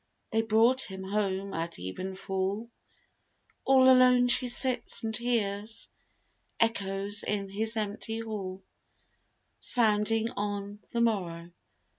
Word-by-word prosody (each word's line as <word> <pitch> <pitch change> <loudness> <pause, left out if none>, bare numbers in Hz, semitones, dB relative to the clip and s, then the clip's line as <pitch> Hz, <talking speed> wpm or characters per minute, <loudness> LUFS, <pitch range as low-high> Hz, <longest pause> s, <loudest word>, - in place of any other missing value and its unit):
They 225 -1 +2
brought 225 +4 +4
him 190 0 -7
home 195 -1 -2
at 165 +1 -4
even 185 - -5
fall: 195 +4 -3 0.9
All 265 -1 +6
alone 255 -1 +6
she 250 +1 +2
sits 250 0 -1
and 220 -1 -2
hears 220 -3 -2 0.7
Echoes 200 -2 0
in 200 -2 -2
his 220 +3 -2
empty 215 +1 -3
hall, 195 -4 -5 1.0
Sounding 225 0 +2
on 205 -1 -4
the 235 - 0
morrow. 175 -7 -1
210 Hz, 110 wpm, -29 LUFS, 195-230 Hz, 1.0 s, All